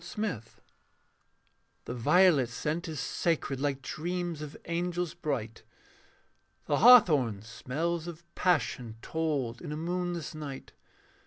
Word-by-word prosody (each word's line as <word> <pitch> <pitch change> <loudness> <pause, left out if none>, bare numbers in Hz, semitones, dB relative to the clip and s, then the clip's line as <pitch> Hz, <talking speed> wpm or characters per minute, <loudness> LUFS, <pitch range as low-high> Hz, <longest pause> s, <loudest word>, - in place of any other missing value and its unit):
THE - - -6
MARINER 210 - -1 1.4
The - - -4
violet 145 +1 +4
scent 155 +8 -3
is 155 -3 -5
sacred 140 +1 -1
Like 140 -1 -1
dreams 175 +2 -3
of 150 -1 -7
angels 175 0 -2
bright; 115 -7 -4 1.0
The - - +1
hawthorn 150 - +6
smells 160 +9 -3
of 170 -1 -8
passion 125 -9 0
Told 145 -7 -2
in - - -6
a 150 - -3
moonless 175 0 -3
night. 145 -3 -7
155 Hz, 115 wpm, -30 LUFS, 130-175 Hz, 1.4 s, hawthorn